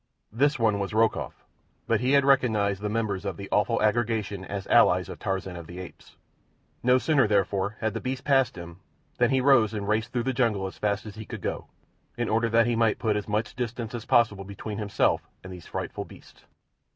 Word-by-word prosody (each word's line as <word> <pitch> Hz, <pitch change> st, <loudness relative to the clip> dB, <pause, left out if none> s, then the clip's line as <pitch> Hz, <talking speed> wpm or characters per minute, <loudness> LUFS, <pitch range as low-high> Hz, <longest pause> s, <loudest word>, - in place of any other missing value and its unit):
This 145 Hz, +6 st, +2 dB
one 110 Hz, -4 st, +2 dB
was 100 Hz, +1 st, -3 dB
Rokoff; 115 Hz, 0 st, 0 dB, 0.4 s
but -, -, +1 dB
he 125 Hz, +3 st, +1 dB
had 140 Hz, -1 st, +5 dB
recognized 110 Hz, -8 st, +2 dB
the 105 Hz, -, -2 dB
members 105 Hz, -3 st, -2 dB
of 95 Hz, -4 st, -4 dB
the 100 Hz, -, -7 dB
awful 115 Hz, +3 st, +2 dB
aggregation 110 Hz, -3 st, 0 dB
as 100 Hz, +1 st, -5 dB
allies -, -, +4 dB
of -, -, -8 dB
Tarzan 95 Hz, -1 st, -3 dB
of 85 Hz, -2 st, -9 dB
the 85 Hz, +3 st, -10 dB
Apes. 90 Hz, -1 st, -11 dB, 0.7 s
No 125 Hz, +1 st, +4 dB
sooner, 140 Hz, -2 st, +3 dB
therefore, 100 Hz, 0 st, 0 dB
had 110 Hz, -2 st, 0 dB
the -, -, -4 dB
beasts 130 Hz, +1 st, -4 dB
passed 135 Hz, -2 st, +2 dB
him 85 Hz, 0 st, -10 dB, 0.4 s
than -, -, +4 dB
he 135 Hz, -1 st, +2 dB
rose 120 Hz, -5 st, +4 dB
and 100 Hz, -1 st, -4 dB
raced 110 Hz, +1 st, 0 dB
through 120 Hz, -2 st, -1 dB
the 130 Hz, +2 st, -1 dB
jungle 115 Hz, -6 st, +1 dB
as 95 Hz, -, -7 dB
fast 105 Hz, 0 st, -1 dB
as 105 Hz, -, -8 dB
he 110 Hz, -, -7 dB
could -, -, -8 dB
go, -, -, -4 dB, 0.5 s
in 120 Hz, -1 st, -1 dB
order 115 Hz, +1 st, +1 dB
that 115 Hz, +1 st, +4 dB
he 120 Hz, -1 st, +1 dB
might 115 Hz, -2 st, +2 dB
put 110 Hz, -2 st, 0 dB
as 105 Hz, -1 st, -3 dB
much 105 Hz, +2 st, -2 dB
distance 120 Hz, -2 st, -4 dB
as 120 Hz, -1 st, -5 dB
possible 110 Hz, -6 st, +3 dB
between 100 Hz, +2 st, -7 dB
himself 105 Hz, -2 st, 0 dB, 0.2 s
and 95 Hz, -, -8 dB
these 90 Hz, -3 st, -11 dB
frightful -, -, -5 dB
beasts. -, -, -17 dB
110 Hz, 210 wpm, -26 LUFS, 100-120 Hz, 0.7 s, had